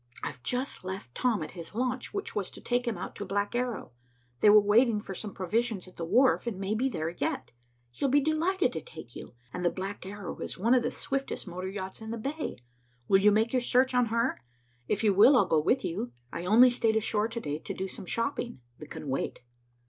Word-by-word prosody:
"I've 125 - -5
just 250 - -2
left 185 -9 -6
Tom 225 - +1
at - - -7
his 170 +2 -10
launch, 250 +1 -1
which 400 -1 -4
was 200 -3 -1
to - - -11
take 245 0 -1
him 235 - -1
out - - -6
to - - -4
the - - -8
Black 205 +2 -1
Arrow. 245 - -2 0.5
They 210 - +6
were 210 +1 +9
waiting 215 +2 +4
for 200 -2 -7
some 205 +2 -5
provisions 205 +2 -1
at 185 - -15
the 165 - -4
wharf, 245 +7 +3
and 205 -5 -3
may 195 +2 -1
be 250 +5 +1
there 160 -9 -2
yet. 175 - -3 0.4
He'll 270 - -1
be 285 +3 +5
delighted 315 +2 +1
to 160 - -3
take 140 -7 -12
you, - - -9 0.2
and 180 - -4
the 175 - +4
Black 195 +3 -5
Arrow 195 -1 -7
is - - -4
one 225 +7 +3
of 255 - +5
the 240 - 0
swiftest 275 +1 -3
motor 185 +1 -4
yachts 190 +1 -6
in 220 - -7
the 230 - -3
bay. 285 +7 -4 0.5
Will 195 - +5
you 210 +1 +6
make 220 +3 +2
your 255 - +3
search 255 +2 +3
on 250 -1 +3
her? 230 +3 0 0.5
If 210 +2 0
you 210 -2 +4
will, 245 +8 +7
I'll - - +5
go 160 - +3
with 255 - +2
you. 125 -8 -3 0.2
I 170 - -4
only 235 +6 +7
stayed 225 -2 +1
ashore 220 0 +1
to 230 +1 -5
day 150 -7 -3
to - - -6
do 190 - -3
some 185 - -9
shopping 235 - -2 0.2
that 150 - -10
can 150 - -7
wait." 135 0 -2
215 Hz, 235 wpm, -29 LUFS, 185-245 Hz, 0.5 s, were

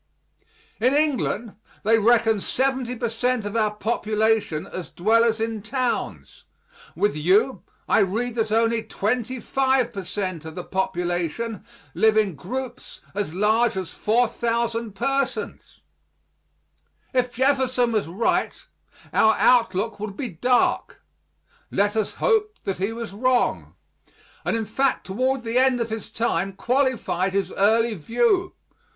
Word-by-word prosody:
In 255 +5 +3
England 255 -8 0 0.3
they 225 +2 +4
reckon 225 -1 +3
70 260 +2 -1
per 235 0 -2
cent. 235 0 -1
of 205 +2 -4
our 215 -2 +2
population 215 -5 0
as 185 -2 -7
dwellers 225 +4 +2
in 225 -1 -2
towns. 250 +3 -3 0.5
With 205 -4 +1
you, 190 - +2 0.3
I - - +4
read 220 +5 0
that 225 -2 -1
only 230 +1 +2
25 250 +3 0
per 195 - -5
cent. 185 -3 -4
of 160 0 -9
the 180 - -5
population 180 +3 -2 0.3
live 220 +5 +3
in 210 -4 +2
groups 250 - -7
so 205 +1 -1
large 220 +3 +2
as 185 -3 -4
4,000 230 0 0
persons. 270 +5 -3 1.3
If 250 -1 +1
Jefferson 260 -2 +2
was 215 -5 0
right 190 +8 0 0.6
our 220 0 +4
outlook 225 -3 +2
would 205 -1 -6
be 260 -4 -3
dark. 245 +8 0 0.7
Let 205 +2 +1
us 220 -2 -1
hope 425 -2 +1
that 195 -2 -2
he 195 +4 -1
was 230 -3 -6
wrong, 250 +4 0 0.7
and - - 0
in 225 - -2
fact 265 +5 0
toward 255 +6 -1
the 230 +2 +1
end 260 -1 +3
of 230 -1 -2
his 220 -1 -5
time 195 -5 -1
qualified 240 -6 0
his 195 -2 0
early 225 +3 +3
view. 370 - +1
225 Hz, 130 wpm, -23 LUFS, 205-250 Hz, 1.3 s, they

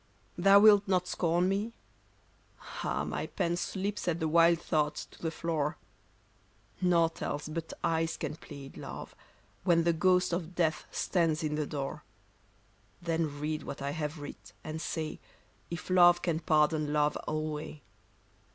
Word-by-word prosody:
Thou 195 +3 +7
wilt 205 -1 +7
not 185 -2 +1
scorn 175 0 +1
me? 205 +4 -1 1.1
Ah, - - -1
my - - -3
pen 170 0 -1
Slips 195 +2 -3
at 170 -1 +1
the 160 - 0
wild 170 +1 +5
thought 150 -3 0
to - - -9
the 165 - -1
floor; 160 -2 -2 1.0
Nought 170 -2 +2
else 145 +1 -3
but 165 +1 -5
eyes 165 0 0
can - - -4
plead, 140 -3 -11
love, - - -7 0.5
when 170 -2 +4
The 170 0 +3
ghost 180 +2 +3
of 175 0 -3
death 160 -3 +1
stands 165 -3 0
in 150 -1 -1
the 150 -1 -1
door; 140 -2 -4 1.0
Then 165 -4 -2
read 155 +1 -2
what 140 - -7
I 140 - -1
have 150 +1 -3
writ, 145 -1 -10
and 155 +1 -5
say 155 -2 -3 0.5
If 175 +2 -6
love 175 -1 +6
can 165 -3 0
pardon 155 -2 +2
love 150 0 +2
alway. 155 -1 -4
165 Hz, 150 wpm, -31 LUFS, 155-175 Hz, 1.1 s, Thou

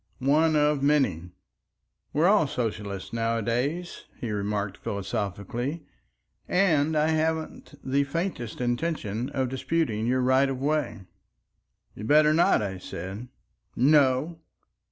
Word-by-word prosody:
"One 155 +4 +3
of 150 -1 +2
many." 135 - +1 0.8
"We're 155 +3 +2
all 200 -6 +4
socialists 105 -6 -4
nowadays," 115 +9 -2
he 115 - -4
remarked 100 -1 -2
philosophically, 100 - -4 0.6
"and 160 -5 +2
I 155 +1 +2
haven't 160 -1 -2
the 140 +2 +1
faintest 140 - -4
intention 120 -3 -2
of 135 -2 -1
disputing 130 -4 -1
your 130 +1 +2
right 130 +2 +3
of 130 -1 -3
way." 145 -6 -1 0.9
"You'd 105 - -7
better 150 +2 +5
not," 160 -8 +3
I 95 -2 -4
said. 95 +7 -7 0.5
"No!" 145 +3 +3
130 Hz, 115 wpm, -26 LUFS, 110-155 Hz, 0.9 s, better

